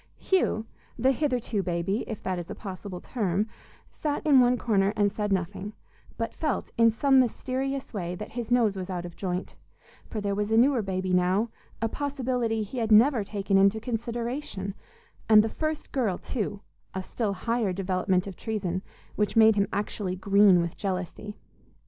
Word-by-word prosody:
Hugh, 360 Hz, -, +1 dB, 0.3 s
the 260 Hz, +3 st, +3 dB
"hitherto 250 Hz, -7 st, 0 dB
baby," 185 Hz, +4 st, -1 dB
if 220 Hz, -, -6 dB
that 185 Hz, -1 st, -1 dB
is 170 Hz, -, -7 dB
a -, -, -5 dB
possible 190 Hz, -2 st, -7 dB
term, 200 Hz, -3 st, -1 dB, 0.4 s
sat 295 Hz, 0 st, -3 dB
in 285 Hz, -4 st, +6 dB
one 250 Hz, 0 st, +4 dB
corner 205 Hz, -3 st, +2 dB
and 205 Hz, -2 st, +2 dB
said 210 Hz, -1 st, -2 dB
nothing, 190 Hz, +2 st, -2 dB, 0.4 s
but 230 Hz, 0 st, -2 dB
felt, 305 Hz, -4 st, -2 dB
in 230 Hz, 0 st, +6 dB
some 270 Hz, +4 st, +4 dB
mysterious 260 Hz, +2 st, -1 dB
way, 180 Hz, -4 st, -3 dB
that 210 Hz, +4 st, -7 dB
his 235 Hz, -1 st, -5 dB
nose 235 Hz, -5 st, +3 dB
was 185 Hz, -1 st, -5 dB
out 175 Hz, -2 st, -3 dB
of 175 Hz, -, -9 dB
joint; 180 Hz, -1 st, -4 dB, 0.5 s
for 220 Hz, -, -4 dB
there 200 Hz, -1 st, -1 dB
was 205 Hz, +1 st, -1 dB
a 220 Hz, -, +3 dB
newer 255 Hz, 0 st, +4 dB
baby 185 Hz, -2 st, -2 dB
now, 185 Hz, +5 st, +2 dB, 0.3 s
a -, -, +3 dB
possibility 250 Hz, -4 st, -1 dB
he 230 Hz, +5 st, -5 dB
had 225 Hz, -1 st, -1 dB
never 230 Hz, +2 st, +6 dB
taken 200 Hz, -1 st, +1 dB
into 200 Hz, +3 st, +4 dB
consideration; 235 Hz, -3 st, -3 dB, 0.6 s
and 215 Hz, -1 st, +8 dB
the 225 Hz, -, -1 dB
"first 310 Hz, +4 st, -3 dB
girl," 225 Hz, -9 st, 0 dB
too, 205 Hz, -4 st, -4 dB, 0.3 s
a 190 Hz, -, -2 dB
still 210 Hz, 0 st, -2 dB
higher 230 Hz, 0 st, 0 dB
development 185 Hz, 0 st, 0 dB
of 195 Hz, -2 st, -7 dB
treason, 190 Hz, -5 st, -3 dB, 0.3 s
which 210 Hz, -1 st, 0 dB
made 220 Hz, -1 st, +7 dB
him 200 Hz, -1 st, +2 dB
actually 200 Hz, -2 st, -2 dB
green 195 Hz, -1 st, +5 dB
with 170 Hz, -1 st, -3 dB
jealousy. 195 Hz, +2 st, -4 dB
210 Hz, 175 wpm, -27 LUFS, 190-240 Hz, 0.6 s, and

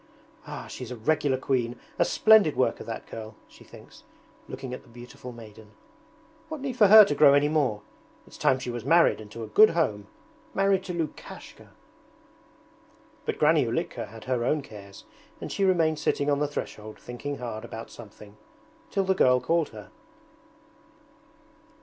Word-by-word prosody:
'Ah, -, -, -7 dB
she's 125 Hz, -3 st, -8 dB
a 125 Hz, -, -6 dB
regular 140 Hz, +3 st, 0 dB
queen, 125 Hz, -2 st, -2 dB, 0.2 s
a -, -, +6 dB
splendid 215 Hz, -8 st, +5 dB
worker, 130 Hz, -, 0 dB
that 115 Hz, 0 st, -7 dB
girl!' 110 Hz, -1 st, -9 dB
she -, -, -18 dB
thinks, -, -, -16 dB, 0.4 s
looking 130 Hz, -2 st, -7 dB
at -, -, -7 dB
the 125 Hz, -, -22 dB
beautiful 120 Hz, +1 st, -11 dB
maiden. 110 Hz, -2 st, -14 dB, 0.8 s
'What 315 Hz, -1 st, -5 dB
need 265 Hz, -2 st, -4 dB
for 215 Hz, -4 st, +5 dB
her 215 Hz, +1 st, +10 dB
to 145 Hz, -, -1 dB
grow 140 Hz, -1 st, +6 dB
any 145 Hz, +1 st, +3 dB
more? 135 Hz, -9 st, 0 dB, 0.4 s
It's -, -, -15 dB
time 130 Hz, -, +3 dB
she 130 Hz, -1 st, -5 dB
was 120 Hz, -2 st, -6 dB
married 165 Hz, -2 st, +4 dB
and 105 Hz, -, -12 dB
to 115 Hz, +2 st, -8 dB
a -, -, -6 dB
good 215 Hz, -, +6 dB
home; 105 Hz, -12 st, -1 dB, 0.5 s
married 195 Hz, -1 st, +2 dB
to 180 Hz, -, -5 dB
Lukashka!' 160 Hz, -3 st, -7 dB, 1.5 s
But -, -, -2 dB
Granny -, -, +4 dB
Ulitka -, -, -3 dB
had 110 Hz, +1 st, -12 dB
her 125 Hz, -2 st, -1 dB
own 150 Hz, +4 st, 0 dB
cares 100 Hz, -5 st, -12 dB, 0.4 s
and -, -, -7 dB
she 200 Hz, -, -1 dB
remained 165 Hz, -5 st, +2 dB
sitting 145 Hz, +1 st, 0 dB
on 140 Hz, -, +1 dB
the 150 Hz, -, 0 dB
threshold 110 Hz, -6 st, -7 dB
thinking 140 Hz, +4 st, -6 dB
hard 115 Hz, -3 st, -6 dB
about 115 Hz, 0 st, -9 dB
something, 105 Hz, -2 st, -14 dB, 0.5 s
till 195 Hz, -, 0 dB
the 190 Hz, 0 st, +2 dB
girl 125 Hz, -8 st, +4 dB
called 165 Hz, +2 st, 0 dB
her. 105 Hz, -3 st, -12 dB
130 Hz, 170 wpm, -26 LUFS, 115-160 Hz, 1.5 s, her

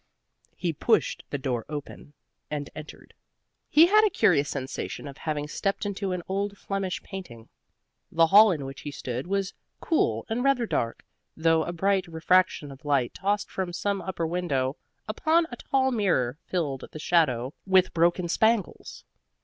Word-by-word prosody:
He 175 Hz, -2 st, -2 dB
pushed 225 Hz, +9 st, +1 dB
the 145 Hz, -, -2 dB
door 130 Hz, -4 st, -2 dB
open, 145 Hz, 0 st, -7 dB, 0.4 s
and 145 Hz, -1 st, -4 dB
entered. 155 Hz, 0 st, -11 dB, 0.6 s
He 315 Hz, +2 st, +7 dB
had 425 Hz, +4 st, +5 dB
a 430 Hz, -, +4 dB
curious 145 Hz, -, +3 dB
sensation 135 Hz, +1 st, -5 dB
of 140 Hz, 0 st, -10 dB
having 150 Hz, -2 st, -3 dB
stepped 195 Hz, +7 st, -2 dB
into 200 Hz, -1 st, -2 dB
an 180 Hz, -1 st, -3 dB
old 200 Hz, +1 st, -2 dB
Flemish 195 Hz, -2 st, -3 dB
painting. 120 Hz, -, -9 dB, 0.6 s
The 165 Hz, 0 st, +5 dB
hall 210 Hz, +6 st, +8 dB
in 150 Hz, -6 st, -3 dB
which 135 Hz, 0 st, -8 dB
he 150 Hz, -, -5 dB
stood 130 Hz, 0 st, -5 dB
was 195 Hz, 0 st, -1 dB, 0.3 s
cool 115 Hz, -, 0 dB
and 230 Hz, +3 st, -1 dB
rather 275 Hz, -3 st, +2 dB
dark, 115 Hz, -, -2 dB, 0.3 s
though 160 Hz, 0 st, +3 dB
a -, -, -3 dB
bright 190 Hz, +2 st, +1 dB
refraction 165 Hz, -2 st, +2 dB
of 135 Hz, +3 st, -13 dB
light 140 Hz, -4 st, +1 dB
tossed 205 Hz, +1 st, -1 dB
from 185 Hz, -2 st, -3 dB
some 200 Hz, +2 st, -1 dB
upper 175 Hz, -3 st, -3 dB
window 150 Hz, -6 st, -1 dB, 0.3 s
upon 315 Hz, +10 st, +2 dB
a -, -, -5 dB
tall 265 Hz, 0 st, +1 dB
mirror 160 Hz, -, +1 dB
filled 150 Hz, -7 st, -2 dB
the -, -, -8 dB
shadow 145 Hz, -6 st, +1 dB
with 190 Hz, -1 st, +4 dB
broken 175 Hz, +1 st, +2 dB
spangles. 220 Hz, +2 st, 0 dB
175 Hz, 160 wpm, -27 LUFS, 145-200 Hz, 0.6 s, hall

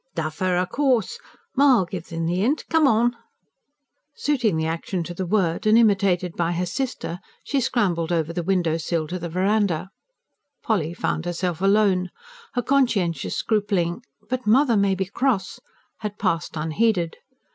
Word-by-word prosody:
"Duffer! 165 Hz, +3 st, -1 dB
Of 180 Hz, 0 st, 0 dB
course. 255 Hz, -6 st, +1 dB, 0.4 s
Ma'll 260 Hz, -7 st, +5 dB
give 175 Hz, -1 st, -7 dB
'em 165 Hz, 0 st, -2 dB
the 175 Hz, +3 st, 0 dB
'int. 265 Hz, +9 st, 0 dB
Come 320 Hz, -2 st, +5 dB
on!" 240 Hz, 0 st, +3 dB, 1.0 s
Suiting 245 Hz, -, +1 dB
the 160 Hz, -, 0 dB
action 165 Hz, +2 st, -2 dB
to 175 Hz, -, -6 dB
the 185 Hz, +1 st, -4 dB
word, 190 Hz, 0 st, +1 dB
and 215 Hz, +1 st, +6 dB
imitated 195 Hz, -6 st, +2 dB
by 170 Hz, 0 st, 0 dB
her 175 Hz, +1 st, -1 dB
sister, 180 Hz, -4 st, -4 dB, 0.2 s
she 280 Hz, -2 st, 0 dB
scrambled 180 Hz, -9 st, 0 dB
over 165 Hz, -1 st, 0 dB
the 175 Hz, -, -2 dB
window 170 Hz, -3 st, +1 dB
sill 165 Hz, 0 st, -2 dB
to 180 Hz, +1 st, -3 dB
the 170 Hz, 0 st, -5 dB
verandah. 190 Hz, 0 st, 0 dB, 0.7 s
Polly 175 Hz, -7 st, 0 dB
found 165 Hz, -2 st, -2 dB
herself 175 Hz, -1 st, -2 dB
alone. 195 Hz, -2 st, +3 dB, 0.5 s
Her 245 Hz, -, 0 dB
conscientious 230 Hz, -11 st, +1 dB
scrupling: 200 Hz, -6 st, 0 dB, 0.3 s
"But 250 Hz, 0 st, -3 dB
mother 245 Hz, +2 st, +4 dB
may 200 Hz, -1 st, +2 dB
be 190 Hz, 0 st, -1 dB
cross!" 200 Hz, -1 st, -1 dB, 0.4 s
had 210 Hz, -1 st, -5 dB
passed 165 Hz, -1 st, -1 dB
unheeded. 170 Hz, +2 st, 0 dB
185 Hz, 155 wpm, -23 LUFS, 170-220 Hz, 1.0 s, and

